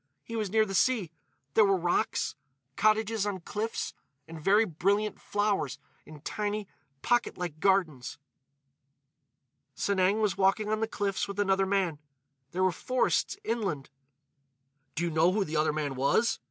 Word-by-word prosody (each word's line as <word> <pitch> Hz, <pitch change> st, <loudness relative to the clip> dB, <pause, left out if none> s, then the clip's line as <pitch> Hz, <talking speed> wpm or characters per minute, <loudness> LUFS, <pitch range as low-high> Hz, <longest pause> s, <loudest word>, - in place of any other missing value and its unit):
"He 230 Hz, -, -7 dB
was 215 Hz, -3 st, -1 dB
near 220 Hz, +2 st, +3 dB
the 195 Hz, -, -6 dB
sea. 200 Hz, -4 st, +2 dB, 0.4 s
There 220 Hz, -, +6 dB
were 195 Hz, -1 st, +3 dB
rocks—cottages 180 Hz, -, 0 dB
on 190 Hz, -3 st, -3 dB
cliffs—and 165 Hz, -7 st, -6 dB
very 205 Hz, +7 st, +4 dB
brilliant 200 Hz, +4 st, 0 dB
flowers 205 Hz, -10 st, 0 dB, 0.3 s
in 150 Hz, -2 st, -12 dB
tiny, 210 Hz, +3 st, -3 dB, 0.4 s
pocket 240 Hz, 0 st, +1 dB
like 175 Hz, -4 st, -5 dB
gardens. 160 Hz, -11 st, +1 dB, 1.6 s
"Sanang 195 Hz, -, +2 dB
was 210 Hz, -4 st, 0 dB
walking 195 Hz, +2 st, +2 dB
on 215 Hz, 0 st, 0 dB
the 225 Hz, -, 0 dB
cliffs 200 Hz, -3 st, -2 dB
with 200 Hz, 0 st, -6 dB
another 195 Hz, -1 st, +2 dB
man. 190 Hz, -6 st, 0 dB, 0.5 s
There 185 Hz, +4 st, -1 dB
were 185 Hz, -, +4 dB
forests, 255 Hz, -, 0 dB
inland." 200 Hz, -, -2 dB, 1.0 s
"Do 170 Hz, -, -1 dB
you 170 Hz, -, 0 dB
know 160 Hz, +3 st, +4 dB
who 205 Hz, 0 st, +2 dB
the 155 Hz, -1 st, -3 dB
other 155 Hz, 0 st, +2 dB
man 150 Hz, -2 st, -2 dB
was?" 140 Hz, -, +2 dB
195 Hz, 140 wpm, -29 LUFS, 160-215 Hz, 1.6 s, There